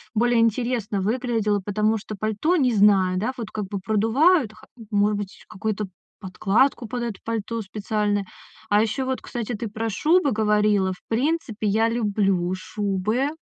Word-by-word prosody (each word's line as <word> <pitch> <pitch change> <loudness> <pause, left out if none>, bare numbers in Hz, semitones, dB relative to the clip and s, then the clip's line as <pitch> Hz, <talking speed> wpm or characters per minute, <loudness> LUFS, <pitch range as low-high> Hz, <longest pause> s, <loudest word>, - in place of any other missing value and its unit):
более 240 +1 +3
интересно 230 -3 0
выглядела, 220 -1 0
потому 215 +2 +1
что 215 +1 -7
пальто, 215 - 0
не 260 -8 +2
знаю, 195 -3 +4
да, 225 +6 -1
вот 225 -3 -6
как 210 -2 -3
бы 200 0 -4
продувают 225 - +3
ха - - -17 0.3
может 205 0 +2
быть, 200 -1 -7
какую-то 215 +1 -3 0.3
подкладку 215 +6 +1
под 240 +2 -3
это 230 -5 -4
пальто 230 0 -3
специальное. 205 0 -1 0.4
А 205 +1 +4
ещё 225 +4 -1
вот, 260 0 -2
кстати, 240 0 -4
ты 230 +1 -4
про 225 +2 -3
шубы 305 - +2
говорила. 210 -3 +2
В 180 - -16
принципе, 240 -3 -1
я 220 +3 +3
люблю 200 -6 0
шубы, 210 +7 -1
215 Hz, 155 wpm, -24 LUFS, 205-235 Hz, 0.4 s, знаю